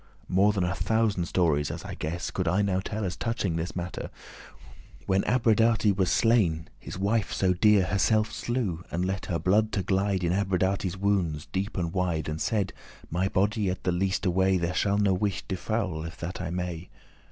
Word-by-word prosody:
More 100 +3 +4
than 100 -3 -1
a 90 +1 0
thousand 110 -4 +1
stories, 80 -5 +1
as - - -6
I - - -6
guess, 85 +4 -4
Could 90 -2 -2
I 95 +5 +2
now 95 -2 +1
tell 105 +2 -3
as 90 -3 -3
touching 95 -1 -2
this 85 +2 -3
mattere. 90 0 -4 1.0
When 95 0 +2
Abradate 115 -3 +3
was 95 -2 +1
slain, 95 -9 +2
his - - -8
wife 100 +2 0
so 95 -1 +2
dear 105 +2 +5
<23> - - -4
Herselfe 110 +2 +2
slew, 110 -9 -2
and 90 +2 -1
let 95 +1 -3
her 85 - 0
blood 105 +7 +2
to 100 - 0
glide 95 0 0
In 85 0 +1
Abradate's 95 -1 0
woundes, 95 -6 0
deep 100 +3 -3
and 85 -2 -2
wide, 90 -4 -1
And 75 +1 -4
said, 100 -4 0 0.4
'My 90 +3 +1
body 100 +1 +1
at 90 0 -4
the 90 - +1
leaste 95 +3 0
way 95 +1 +3
There 85 0 -1
shall 100 +2 +1
no 100 -2 +3
wight 100 +1 -1
defoul, 95 -3 -2
if 80 0 -7
that 90 +2 -5
I 85 - -3
may. 90 -1 -4
95 Hz, 195 wpm, -27 LUFS, 90-100 Hz, 1.0 s, dear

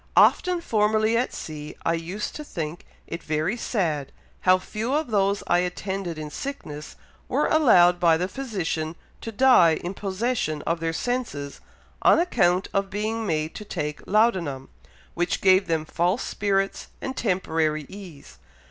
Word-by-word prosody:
Often 360 -2 +5
formerly 215 -3 +2
at 245 +2 +1
sea 150 -1 -7
I 165 - +2
used 175 +5 -4
to 300 - -6
think 165 - -6 0.2
it 170 - -6
very 155 +7 -1
sad 165 - -1 0.3
how 185 0 +5
few 220 +7 -3
of 305 -5 -1
those 200 -1 +1
I 175 - +3
attended 180 -1 -3
in 155 -1 -6
sickness 150 - -6 0.3
were - - +1
allowed 180 - +5
by 165 -2 +4
the 180 +2 -1
physician 180 -10 -3 0.3
to 225 - -5
die 210 -9 +5
in 175 +4 -5
possession 195 -5 -2
of 165 0 -1
their 165 0 -1
senses, 165 - -3 0.4
on - - +6
account 190 - +2
of 195 0 0
being 215 +2 -2
made 155 -2 -1
to - - -7
take 150 -7 -4
laudanum, 185 - +1 0.4
which 175 +1 -1
gave 190 0 +4
them 160 -2 0
false 175 +8 0
spirits 195 -1 -1
and 265 - -5
temporary 160 - 0
ease. 180 - -12
185 Hz, 150 wpm, -25 LUFS, 160-215 Hz, 0.4 s, on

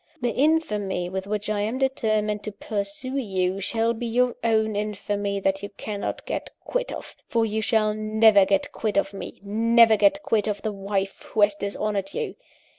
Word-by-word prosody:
The 245 -2 0
infamy 210 - +1
with 190 +1 -4
which 210 0 -2
I 210 -1 0
am 220 +5 -1
determined 215 -6 0
to 215 - -3
pursue 205 +6 -4
you, 190 -5 -1
shall 230 +3 +1
be 235 +1 -4
your 245 +1 +2
own 220 -2 +2
infamy 205 -1 -2
that 195 0 +1
you 205 - -5
cannot 205 0 -5
get - - -3 0.2
quit - - -2
of - - -8
for 230 -1 +2
you 220 0 -1
shall 215 -1 +2
never 215 -1 +5
get 195 0 +1
quit 215 -2 -2
of 200 0 +1
me, 195 - -8
never 225 +2 +5
get 295 +5 +3
quit 220 -2 +1
of 205 -1 -2
the 215 - -1
wife 195 0 -3
who 220 - +2
has 205 0 +5
dishonoured 200 0 -3
you. 465 - -2
210 Hz, 185 wpm, -25 LUFS, 200-230 Hz, 0.2 s, never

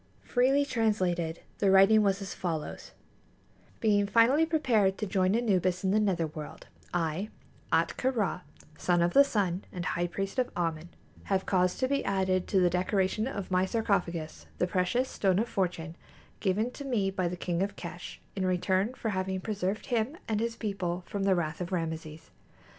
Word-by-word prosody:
Freely 270 +3 +3
translated, 185 - 0 0.2
the 200 - +3
writing 195 +3 +6
was 195 -1 +1
as 195 - -6
follows: 165 -4 -4 0.9
"Being 205 -2 +3
finally 245 +10 +4
prepared 230 - +2
to 215 - -2
join 190 0 +1
Anubis 185 -6 +1
in 190 - +2
the 215 - +3
nether 185 -6 +1
world, 155 -1 -8 0.3
I, 175 +4 -1 0.4
Ahtka 260 - +1
Rā, 210 -7 -1 0.4
son 175 -1 +2
of 175 - +1
the 280 - +8
Sun 200 -8 -1
and 180 -1 -5
High 175 +1 0
Priest 195 +6 -3
of 250 - 0
Āmen, 165 -1 -2 0.4
have 195 -1 0
caused 180 -1 +1
to 260 - +3
be 280 +1 0
added 190 -2 0
to 195 - +2
the 180 - +4
decoration 190 +4 0
of 200 -8 -5
my 185 0 +3
sarcophagus 180 -7 -1
the - - +2
precious 185 +8 0
Stone 190 -6 +1
of 225 +4 +1
Fortune 175 -6 -2 0.4
given 215 +5 0
to 285 - -8
me 220 -8 0
by 185 -2 -1
the 180 +1 -4
King 175 0 -2
of 200 0 -1
Kesh[A] 175 -1 -8 0.2
in 195 - -1
return 185 +5 +1
for 225 - -3
having 190 -1 -2
preserved 200 0 -2
him 245 +5 -1
and 215 -2 0
his 230 +1 -1
people 190 -6 -3
from 200 -2 -3
the 195 -1 +4
wrath 170 -1 -2
of 180 +1 -4
Rameses. 160 -2 -4
190 Hz, 175 wpm, -29 LUFS, 180-215 Hz, 0.9 s, the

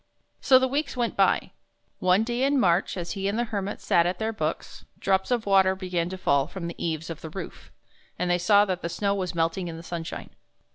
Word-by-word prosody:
So 260 - +6
the 260 0 +2
weeks 280 0 -2
went 240 -2 -1
by. - - +2 0.5
One 185 +3 +3
day 240 +2 -2
in 280 0 +3
March, 180 -2 +2
as 175 -1 -4
he 195 0 -2
and 200 +2 -1
the 240 - +1
Hermit 205 -3 -4
sat 170 0 +3
at 180 0 -2
their 220 +2 -2
books, 215 - -4
drops 190 -1 +1
of 240 -3 0
water 190 -1 +4
began 180 -2 -2
to 190 - -6
fall 140 -6 +2
from 180 0 -7
the 170 - -6
eaves 165 0 -3
of 165 - -8
the 160 - -7
roof, 190 +5 -9 0.5
and 180 - -1
they 175 0 +2
saw 205 +4 +5
that 185 -3 -3
the 170 - -3
snow 200 +3 0
was 185 -3 -3
melting 165 +2 0
in 165 -1 -6
the 165 - -9
sunshine. 165 -1 -6
190 Hz, 230 wpm, -26 LUFS, 170-210 Hz, 0.5 s, So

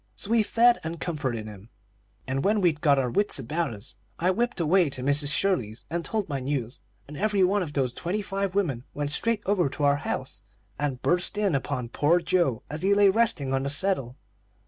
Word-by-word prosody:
So 210 - -5
we 230 -1 +5
fed 235 +3 +4
and 165 +1 -5
comforted 135 -10 -3
him; 105 0 -11 0.6
and 135 +1 -2
when 210 +2 +2
we'd 165 -6 +1
got 145 -4 +4
our 125 -3 0
wits 205 - +1
about 150 +4 -2
us, 105 +6 -5 0.2
I 180 +2 +2
whipped 235 +1 -1
away 170 0 +3
to 130 -2 -7
Mrs. 145 +1 +3
Shirley's 125 - 0
and 170 0 -2
told 215 0 -2
my 140 -3 -3
news, 130 -2 -3 0.3
and 150 - -9
every 205 +3 +1
one 200 +3 +2
of 155 -5 -4
those 130 -4 0
twenty 195 +5 -3
five 195 -1 -3
women 145 -12 0
went 145 0 -2
straight 225 +7 +1
over 190 -7 +2
to 145 +2 -5
our 140 0 +4
house - - -4 0.4
and 140 -4 -2
burst 180 +3 +1
in 205 -4 +1
upon 130 -3 -2
poor 155 +7 +2
Joe, 170 -8 0
as 150 +2 -6
he 200 +1 +3
lay 200 -1 +6
resting 190 -11 +1
on 135 - +1
the 140 - -2
settle. 140 -5 0
155 Hz, 210 wpm, -26 LUFS, 135-195 Hz, 0.6 s, lay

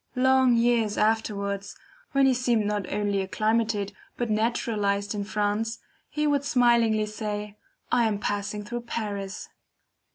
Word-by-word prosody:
Long 260 -1 +4
years 230 -2 +2
afterwards, 200 -2 0 0.4
when 275 0 +4
he 265 - +5
seemed 240 -3 +1
not 205 -2 -2
only 205 -1 0
acclimated, 215 +1 0 0.2
but 240 -2 -1
naturalized 210 -2 0
in 205 -1 -2
France, 210 +2 -1 0.3
he 300 0 -1
would 285 -2 +2
smilingly 235 -5 +3
say: 210 -1 -5 0.4
I 240 -1 +4
am 215 -2 +1
"passing 205 0 -3
through 240 +2 -4
Paris." 205 -4 -5
215 Hz, 130 wpm, -26 LUFS, 205-235 Hz, 0.4 s, he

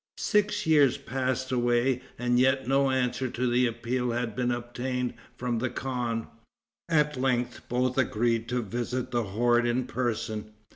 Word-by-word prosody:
Six 210 -1 +1
years 145 -5 +5
passed 130 0 -2
away, 120 +1 +2 0.2
and 120 0 +2
yet 130 0 +3
no 135 +1 +3
answer 130 -1 0
to 125 +1 -2
the 125 +1 +3
appeal 120 +2 -2
had 115 -2 -2
been 125 +1 0
obtained 125 +1 -2 0.2
from 120 -2 -1
the 130 +2 -1
khan. 120 -3 -2 0.6
At 150 -4 +2
length 125 -2 -1
both 125 +1 +1
agreed 115 -1 +1
to 125 -1 0
visit 120 +4 -3
the 120 -2 0
horde 120 +4 +2
in 120 +1 0
person. 110 -4 -3
125 Hz, 150 wpm, -28 LUFS, 120-130 Hz, 0.6 s, years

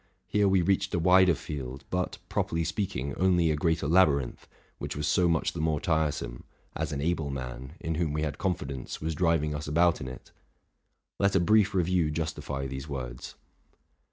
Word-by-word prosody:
Here 105 0 +2
we 95 -2 +3
reached 95 0 +1
a - - +1
wider 90 0 +5
field, 70 -4 -6
but, 90 0 -1
properly 85 0 -1
speaking, 80 -6 -2
only 90 -3 +3
a - - +1
greater 80 0 0
labyrinth, 75 -7 +2 0.3
which - - -4
was 75 0 -2
so 90 +2 +3
much 80 -1 +1
the 85 - -4
more 80 -2 +1
tiresome, 75 -7 -1 0.3
as - - -2
an 70 -1 -3
able 80 -2 0
man, 65 0 -6
in 80 - -2
whom 80 -1 0
we 75 +1 -1
had 75 -2 -3
confidence, 70 -9 -3
was 80 +1 -2
driving 80 -2 +1
us 75 +1 -5
about 85 +3 +3
in - - -5
it. 65 - -10 0.9
Leta 100 -1 +3
brief 105 +2 +3
review 90 -3 +2
justify 75 -3 -3
these 65 +2 -6
words. 60 -3 -6
80 Hz, 175 wpm, -28 LUFS, 70-90 Hz, 0.9 s, wider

